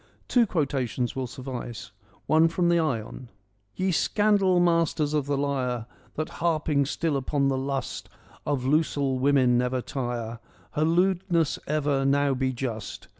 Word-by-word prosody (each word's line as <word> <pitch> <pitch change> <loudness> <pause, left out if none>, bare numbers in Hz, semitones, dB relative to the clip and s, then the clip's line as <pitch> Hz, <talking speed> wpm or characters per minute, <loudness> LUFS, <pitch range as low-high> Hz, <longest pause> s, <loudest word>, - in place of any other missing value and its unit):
Two 240 -3 +3
quotations 135 - -1
will 130 -1 -2
suffice. 125 -2 -7 0.3
One 160 +1 +4
from 170 +1 +1
the 170 0 +4
Ion: 125 -4 -3 0.2
— 100 +2 -43
' 100 0 -44
Ye 185 0 0
scandal 200 0 +3
masters 165 -3 +2
of 145 -2 0
the 145 -1 0
lyre, 130 -4 -1 0.3
That 155 +1 -3
harping 155 -4 +1
still 160 +1 -1
upon 140 +1 0
the 135 - 0
lust 135 -2 -4 0.3
Of 140 -4 -1
losel 140 -2 +1
women 130 -3 +3
never 125 +1 0
tire, 120 -3 -4 0.3
Her 155 - +1
lewdness 175 -1 +1
ever, 145 -2 +1
now 140 0 +2
be 130 0 0
just. 120 -4 -5
140 Hz, 150 wpm, -26 LUFS, 130-160 Hz, 0.3 s, One